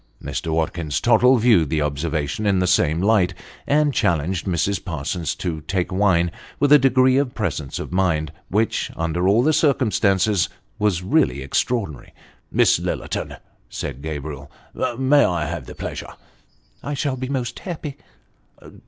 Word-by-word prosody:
Mr. 80 - -4
Watkins 80 -1 -1
Tottle 125 +1 +5
viewed 110 - +4
the 75 0 0
observation 75 +5 -2
in 100 -2 +3
the 90 - +2
same 85 -3 +2
light, 95 -4 +2 0.3
and 145 0 +2
challenged 85 - 0
Mrs. 95 +2 0
Parsons 80 -1 -3
to 80 -4 -4
take 95 -2 -1
wine, 90 -3 +2 0.3
with 145 0 +2
a 150 - +9
degree 130 0 +4
of 140 -3 0
presence 80 - -3
of - - -6
mind, 85 -5 0 0.2
which, 110 +4 0
under 85 +2 -1
all 105 +5 +4
the 155 +3 +3
circumstances, 105 - +2 0.3
was 100 -4 +1
really 125 - +1
extraordinary. 80 - -2 0.2
" - - -40
Miss - - +4
Lillerton," - - -4 0.3
said 70 -1 -6
Gabriel, 70 -2 -6 0.3
" 120 - -1
may 135 +2 +4
I 85 -4 0
have 80 -4 -5
the - - -9
pleasure? - - -6 0.3
" - - -37
" - - -37
I 145 - -3
shall 140 -1 -1
be 130 0 -5
most 130 -4 -3
happy." 155 -6 -6
95 Hz, 160 wpm, -22 LUFS, 80-125 Hz, 0.3 s, a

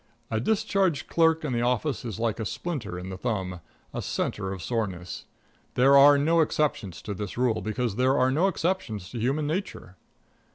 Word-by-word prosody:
A 110 - +1
discharged 190 - +1
clerk 160 -1 +3
in 135 - -1
the 120 - 0
office 125 +4 0
is 115 -3 -5
like 115 -1 -1
a - - -1
splinter 130 - -4
in 90 +1 -6
the 95 0 -7
thumb 95 -7 -2 0.3
a - - -3
centre 95 -2 -2
of 95 -3 -6
soreness. 95 -7 -3 0.5
There 135 +3 +6
are 140 +1 +8
no 165 +4 +3
exceptions 145 - -1
to 105 - -4
this 100 +2 -6
rule, 125 -2 +1
because 110 +1 -2
there 130 +2 +3
are 130 +1 +3
no 160 +8 +3
exceptions 165 - -2
to 120 - -5
human 135 +6 0
nature. 155 - -4
125 Hz, 180 wpm, -27 LUFS, 105-150 Hz, 0.5 s, are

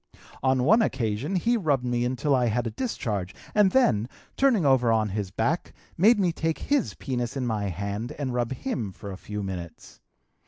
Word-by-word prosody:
On 130 -1 +2
one 220 - +5
occasion 130 - -1
he 230 +7 +2
rubbed 145 - +1
me 120 0 0
until 130 +3 0
I 125 -2 +3
had 120 +2 0
a 115 - -2
discharge 105 - -3 0.2
and 210 -2 +5
then, 120 - +3 0.3
turning 250 - +3
over 130 -4 +4
on 110 -1 +2
his 100 -1 -3
back, 120 - -1 0.2
made 210 +6 +5
me 180 -3 +2
take 160 0 -1
his 285 -4 0
penis 125 -1 -3
in 130 - -1
my 110 -3 -1
hand 100 +5 -3
and 135 -3 -3
rub 120 -1 -1
him 130 - -3
for 100 - -8
a - - -6
few 105 +1 -5
minutes. 90 -4 -7
125 Hz, 190 wpm, -26 LUFS, 105-160 Hz, 0.3 s, one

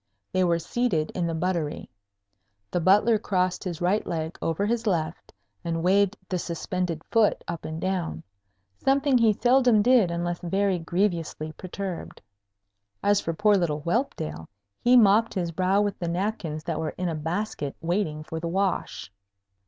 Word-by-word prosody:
They 185 - +2
were 170 -1 +3
seated 170 -3 -1
in 175 -2 -1
the 165 - -2
buttery. 165 -3 -2 0.8
The 175 - +1
Butler 210 +6 +4
crossed 185 -3 0
his 175 -2 -5
right 185 +5 +2
leg 160 0 -3
over 165 +5 0
his 230 +1 -1
left, 165 -4 -2 0.3
and 165 -1 -2
waved 200 +2 +3
the 185 - -2
suspended 170 -1 -3
foot 225 -3 +3
up 170 -1 -5
and 160 +1 -5
down, 175 - -2 0.6
something 275 0 +2
he 225 -2 +5
seldom 245 -1 +4
did 240 -6 +5
unless 175 0 -2
very 190 +1 0
grievously 170 -3 -1
perturbed. 185 +1 -6 0.8
As 205 0 +3
for 165 - -3
poor 210 +3 +4
little 165 -6 +1
Whelpdale, 170 - -2 0.3
he 245 +1 +6
mopped 220 0 +5
his 175 -3 -1
brow 185 +4 +2
with 205 -1 -1
the 175 - -3
napkins 170 -4 -2
that 165 -2 -3
were 160 -1 -3
in 180 - -1
a 165 - -1
basket 160 -1 -3
waiting 165 -3 -1
for 160 +1 -5
the 170 - -4
wash. 180 - -2
180 Hz, 160 wpm, -26 LUFS, 165-205 Hz, 0.8 s, he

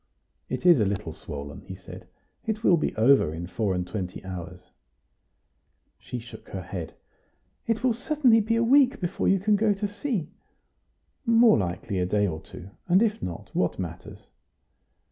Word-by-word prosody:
"It - - -4
is 175 -6 +7
a 105 - +3
little 100 -1 -3
swollen," 70 -1 -8
he 95 - -7
said; 95 - -12 0.4
"it 220 0 -2
will 180 - +6
be 155 - -1
over 115 - +4
in 85 +1 -5
four 95 +1 -1
and 90 0 -2
twenty 90 -1 -5
hours." 90 -1 -8 1.3
She 125 - -6
shook 115 -1 -11
her 95 -2 -5
head. 90 -3 -6 0.7
"It 230 +1 0
will 255 -2 +3
certainly 250 -2 +3
be 225 +2 0
a 230 - +2
week 270 +2 +4
before 180 +1 -2
you 195 - +4
can 210 +3 +3
go 210 0 +3
to 205 +1 -2
sea." 205 - -3 0.9
"More 230 - +5
likely 90 +1 -3
a 90 - 0
day 105 +2 +2
or 80 -5 -3
two; 95 +3 -12 0.2
and 185 +5 +5
if 220 -1 0
not, 85 -2 -6
what - - 0
matters?" - - -7
135 Hz, 170 wpm, -26 LUFS, -, 1.3 s, is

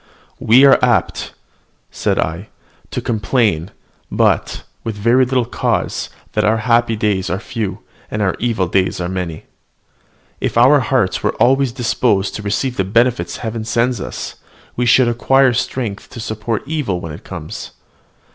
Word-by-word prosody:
"We 125 +5 +6
are 140 - +6
apt," - - +1 0.6
said - - -1
I, 85 +6 -2 0.4
"to - - -3
complain, 105 -6 0 0.4
but - - +1 0.2
with 115 -2 -4
very 115 +5 +3
little 125 -1 +1
cause, 120 - -1 0.2
that - - 0
our 110 +1 +3
happy 120 -1 +3
days 105 -3 0
are 90 - -1
few, 105 -1 -5 0.3
and 105 - -3
our 100 -3 +1
evil 115 -5 0
days 95 +1 0
many. 90 -2 -4 1.0
If - - -2
our 135 +5 +6
hearts 120 -5 0
were - - 0
always 135 0 +3
disposed 115 -4 0
to - - -5
receive 120 +5 -2
the 95 - +2
benefits 115 +5 +1
Heaven 110 0 -3
sends 115 0 0
us, - - -6 0.4
we 125 0 0
should 120 +1 +5
acquire 130 +2 +3
strength 115 -3 -3
to - - -9
support 110 0 -3
evil 145 - -2
when 80 -2 -7
it 75 - -10
comes." 85 -5 -7
115 Hz, 150 wpm, -18 LUFS, 95-125 Hz, 1.0 s, We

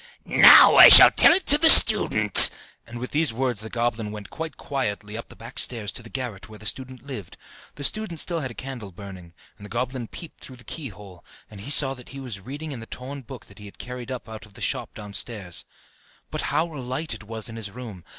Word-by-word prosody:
"Now - - +6
I - - +10
shall - - +10
tell - - +5
it 365 +3 +1
to 290 - +4
the 320 0 +5
student!" 110 - +7 0.4
And 120 +1 -11
with 125 +2 -8
these 155 -2 -1
words 120 -2 -3
the 110 - -9
goblin 115 -2 -4
went 105 -1 -11
quite 160 -1 -8
quietly 105 -6 -6
up 115 - -9
the - - -15
back 115 +1 -10
stairs 110 -5 -2
to - - -11
the 115 - -14
garret, 110 -6 -8
where 110 - -13
the 110 - -15
student 130 +2 -5
lived. 120 -11 -10 0.4
The 145 - -10
student 215 +4 -1
had - - +5
still 170 -2 -3
a 130 -5 -6
candle 125 -7 -9
burning, 95 -2 -13 0.3
and 105 - -13
the - - -19
goblin 125 0 -5
peeped 165 +6 -13
through 130 - -13
the 125 - -17
keyhole, 105 - -11 0.3
and 100 -2 -12
saw 135 -2 +3
that 125 -2 -14
he 135 - -11
was 125 -7 -9
reading 145 +9 -9
in 130 - -8
the 115 - -12
torn 135 +2 -10
book 130 -2 -13
that 100 - -18
he 105 - -13
had 100 - -15
carried 125 -1 -10
up 130 -2 -8
out 110 -1 -11
of 100 - -25
the - - -15
shop - - -4
downstairs. 105 -3 -7 0.7
But - - -5
how 160 - -1
light 130 +2 -5
it 115 - -10
was 110 0 -7
in 115 - -9
his 110 -3 -7
room! 105 -5 -12
120 Hz, 230 wpm, -22 LUFS, 105-135 Hz, 0.7 s, I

